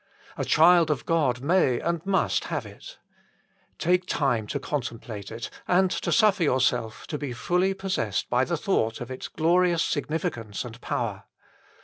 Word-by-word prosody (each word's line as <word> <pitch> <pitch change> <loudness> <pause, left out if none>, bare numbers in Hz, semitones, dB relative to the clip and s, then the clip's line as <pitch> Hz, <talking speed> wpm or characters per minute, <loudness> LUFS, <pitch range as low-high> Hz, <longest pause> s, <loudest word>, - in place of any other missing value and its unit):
A - - -2
child 170 0 +5
of 145 -5 -1
God 140 -8 +1
may 145 -5 +2
and 170 -1 -2
must 195 -1 +1
have - - -3
it. - - -12 0.8
Take 180 +2 +1
time 120 -7 0
to 140 +5 -3
con 145 +1 -2
template 110 -4 -7
it 115 +1 -6 0.2
and 180 +1 +3
to - - -2
suffer 210 -3 +4
yourself 125 -6 +1
to 150 - -5
be 140 -4 -4
fully 180 +9 0
possessed 190 - -2
by 125 +1 +2
the 170 +4 -1
thought 115 - 0
of 120 +1 -7
its 130 - -6
glorious 170 +1 +2
signi 155 +1 -1
ficance 115 -6 -4
and 120 0 -10
power. 115 -8 -3
145 Hz, 165 wpm, -26 LUFS, 120-180 Hz, 0.8 s, child